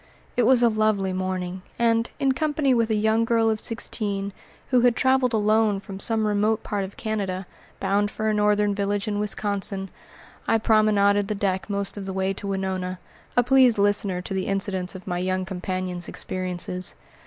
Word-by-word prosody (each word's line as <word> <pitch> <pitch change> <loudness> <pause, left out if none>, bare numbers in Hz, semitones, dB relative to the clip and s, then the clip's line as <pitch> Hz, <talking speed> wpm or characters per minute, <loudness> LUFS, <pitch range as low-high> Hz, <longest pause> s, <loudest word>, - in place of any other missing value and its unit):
It 245 -2 +3
was 250 -1 +5
a - - +7
lovely 215 -4 +1
morning, 185 0 -3 0.2
and, 230 -1 +2
in 270 -1 +3
company 295 -1 +1
with 230 -2 +2
a 220 - +2
young 220 +2 +2
girl 225 -1 +2
of 215 - -1
sixteen, 200 -3 -2 0.4
who 250 -2 +5
had 245 -1 +4
traveled 260 -1 +3
alone 215 -2 +2
from 195 -1 -9
some 220 +1 0
remote 210 +1 +1
part 205 -2 -2
of 190 +1 -8
Canada, 195 -4 -3 0.3
bound 205 +1 +1
for 215 +1 -3
a 215 - +2
northern 210 0 +2
village 200 +1 -1
in 205 -1 -1
Wisconsin, 200 -2 -2 0.6
I 225 - +4
promenaded 210 -2 +3
the 210 - -2
deck 195 -1 -1
most 200 0 -2
of 195 -1 -6
the 190 - -3
way 190 0 0
to 200 - -6
Winona, 190 -1 -2 0.4
a 245 - +6
pleased 255 -2 +5
listener 200 -2 +1
to 195 - -4
the 190 -1 -2
incidents 195 -2 -1
of 185 - -9
my 175 -2 -2
young 185 +1 -1
companion's 185 -1 -4
experiences. 180 0 -3
205 Hz, 180 wpm, -24 LUFS, 190-220 Hz, 0.6 s, a